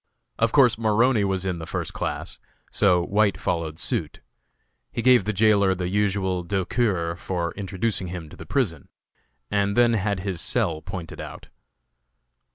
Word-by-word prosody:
Of 115 0 +3
course 125 -6 +5
Maroney 115 +1 +3
was 95 -1 -1
in 90 -3 -2
the 80 - -7
first - - -4
class, - - -4 0.3
so 90 -3 +3
White 100 +2 +2
followed 80 -3 -2
suit. - - -3 0.7
He 115 - -3
gave 125 -5 +5
the 110 - 0
jailer 100 -2 +3
the 90 -1 -3
usual 95 -2 0
douceur 95 -1 0
for 85 -1 -3
introducing 100 0 -2
him 85 -2 -6
to - - -12
the - - -11
prison, 100 - -1 0.6
and 100 0 +1
then 120 -1 +5
had 100 -3 0
his 95 -3 -2
cell 80 -2 0
pointed 85 -2 -7
out. - - -9
95 Hz, 155 wpm, -24 LUFS, 90-110 Hz, 0.7 s, course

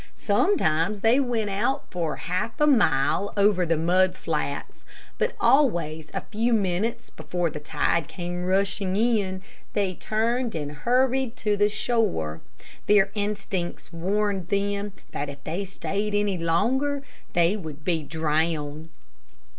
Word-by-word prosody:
Sometimes 200 - +2
they 230 +5 +4
went 235 -6 0
out 240 +8 -1
for 170 -4 -2
half 185 +5 -3
a 300 - +5
mile 200 - +3
over 200 -3 +3
the 165 -1 +2
mud 180 +3 +3
flats, - - -3 0.4
but - - 0
always 170 - +2
a 195 - -3
few 230 +5 0
minutes 215 +4 0
before 175 -2 -2
the 150 - -6
tide 155 +2 0
came 175 0 -5
rushing 195 0 +1
in 205 -4 +1 0.3
they 195 -3 0
turned 230 +5 -1
and 145 -2 -3
hurried 250 - +1
to 210 -1 0
the 205 +1 +3
shore. 205 - 0 0.5
Their 200 -1 +5
instincts 200 -5 -3
warned 195 +1 -1
them 200 +1 -1 0.2
that 145 0 -3
if 140 0 -10
they 175 +6 -3
stayed 200 +2 -2
any 205 -3 +1
longer 265 - +1 0.3
they 175 +3 +3
would 155 -7 -8
be 170 -3 +1
drowned. 155 0 -1
195 Hz, 135 wpm, -25 LUFS, 165-215 Hz, 0.5 s, a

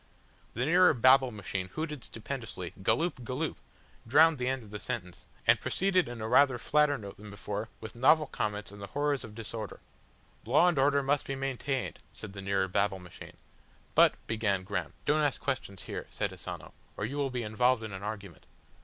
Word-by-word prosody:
The 125 +4 0
nearer 175 +1 +5
Babble 130 +2 +6
Machine 100 -4 -4
hooted 150 - -4
stupendously, 115 -7 -6
"Galloop, 125 - +1
Galloop," 130 +1 -3 0.5
drowned 155 +4 +6
the 125 - -1
end 130 -1 -1
of 105 - -14
the 105 - -5
sentence, 105 -8 -5 0.2
and - - +5
proceeded 185 -1 +2
in 120 -2 -7
a 110 - -2
rather 135 +1 +5
flatter 150 +3 +2
note 100 -4 -9
than 105 +1 -11
before 105 +1 -5
with 110 - -8
novel 150 +6 +5
comments 105 -6 -3
on 100 - -11
the 100 - -6
horrors 145 +3 0
of 105 -1 -10
disorder. 110 -2 -6 0.6
"Law 145 +10 +4
and 175 -6 +2
order 140 +1 +3
must 140 +1 +1
be 135 - -2
maintained," 135 0 -2 0.2
said 100 - -8
the 100 - -7
nearer 95 -1 +1
Babble 100 +1 +1
Machine. 90 -2 -12 0.6
"But," - - +6
began 105 -4 0
Graham. 95 -3 -3
"Don't 150 +1 +3
ask 145 -3 +1
questions 125 -8 -3
here," - - -6
said - - -2
Asano, - - -7 0.2
"or 105 - -1
you 135 +6 -4
will 140 -1 0
be 125 -2 -3
involved 115 +2 +2
in 110 -2 -6
an 95 - -6
argument." 100 -5 -7
120 Hz, 190 wpm, -30 LUFS, 105-140 Hz, 0.6 s, Babble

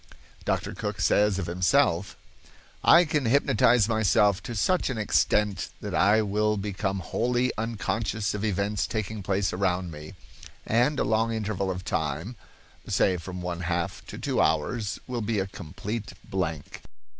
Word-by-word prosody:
Dr. - - -1
Cooke 105 0 -4
says 105 0 +3
of 95 - -2
himself: 90 +2 +1 0.7
"I 170 +1 +7
can 150 -3 0
hypnotize 120 -3 +4
myself 105 -2 +3
to 120 - -6
such 175 - +1
an 130 - -3
extent 105 -1 +1
that - - -6
I 105 +2 +4
will 105 +1 +1
become 100 -1 -2
wholly 125 +6 0
unconscious 110 -1 -2
of 105 0 -4
events 100 0 0
taking 110 -1 -3
place 95 0 0
around 90 -1 0
me, 75 +4 -10 0.5
and 125 +6 +2
a - - +2
long 110 +1 +1
interval 105 -3 -2
of 90 -1 -4
time, 80 - -2 0.5
say 95 -2 +2
from 90 +1 -7
one 90 -1 -3
half 85 0 -2
to - - -8
two - - 0
hours, 100 +8 0
will 125 -2 -3
be 110 0 -1
a 95 - +1
complete 95 +4 -6
blank. 85 -6 -3
105 Hz, 150 wpm, -27 LUFS, 90-110 Hz, 0.7 s, I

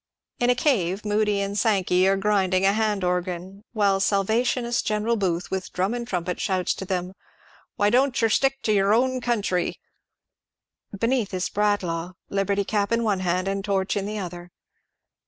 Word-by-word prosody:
In 245 - +2
a 250 - +4
cave 210 - 0
Moody 210 -1 +1
and 200 0 -3
Sankev 190 -4 +2
are 195 0 +3
gruSng 195 -2 +2
a 195 - +4
hand 210 -2 0
^, 180 +2 -3
while 200 -3 +2
Salvationist 230 +5 +1
General 215 +2 0
Booth 180 -4 -2
with 190 -1 -3
drum 190 +5 0
and 240 -1 -4
trumpet 180 -3 -3
shouts 185 -2 0
to 190 - -7
them, 185 0 -3 0.3
" - - -29
Why 205 0 +2
don't 260 +2 +2
yer 225 - +3
stick 270 +4 +1
to 215 - +2
yer 200 0 +3
own 255 +2 +1
country? 210 -7 -1 0.6
" 200 - -17
Beneath 230 -4 0
is 185 - -1
Bradlaugh, 185 -4 -1 0.2
liberty 200 0 0
cap 200 0 -1
in 230 0 +2
one 205 -4 +1
hand 185 +1 0
and 195 0 -2
torch 195 -1 0
in 200 -1 -2
the 215 +1 -4
other. 175 -2 -6
200 Hz, 175 wpm, -24 LUFS, 185-220 Hz, 0.6 s, a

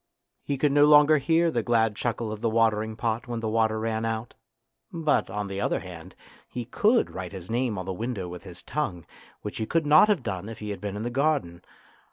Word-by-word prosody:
He 140 - -2
could 145 +1 +2
no 145 +1 +6
longer 150 0 +6
hear 165 +4 +2
the 120 - 0
glad 115 -2 +2
chuckle 115 -1 -2
of 110 0 -6
the 115 - +1
watering 110 -1 +1
pot 115 +2 -2
when 120 -1 -3
the 115 - -3
water 110 0 +1
ran 110 0 -2
out, 115 0 -3 0.6
but, 160 - +1
on 105 +1 -3
the 100 0 -4
other - - 0
hand, 90 0 -10 0.3
he 120 0 -5
could 215 - +2
write 95 -2 -6
his 95 +1 -8
name 120 -3 0
on 95 - -4
the 95 - -3
window 110 -2 -4
with 90 0 -8
his 90 -2 -11
tongue, 95 - -3 0.4
which 105 - -5
he 110 - -2
could 165 -1 +1
not 155 +7 +7
have 200 -11 +1
done 100 -1 -4
if 115 - -8
he 105 -1 -5
had 100 - -6
been 100 -1 -4
in 105 - -4
the 120 - -3
garden. 135 - 0
115 Hz, 230 wpm, -26 LUFS, 105-140 Hz, 0.6 s, not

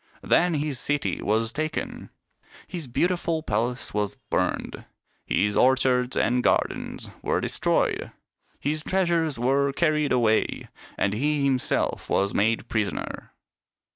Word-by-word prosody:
Then 175 -1 +3
his 145 -3 -2
city 145 +1 -1
was 110 +2 +1
taken, 155 +1 -4 0.6
his 170 -6 -5
beauti 175 +9 +1
ful 160 -2 -1
palace 120 +1 -1
was 105 -1 -1 0.2
burned, - - -1 0.4
his 105 0 +1
orchards 130 -1 +3
and 125 +2 +2
gardens - - -1
were - - 0
destroyed, - - 0 0.5
his 155 +2 -1
treasures 170 -6 +1
were 135 +3 +2
carried 150 -1 +1
away, 115 -3 +1 0.3
and 100 - +1
he 145 +5 0
himself 135 -2 0
was 100 0 +1
made 110 +2 +1
prisoner. 105 -6 -3
130 Hz, 120 wpm, -25 LUFS, 115-155 Hz, 0.6 s, Then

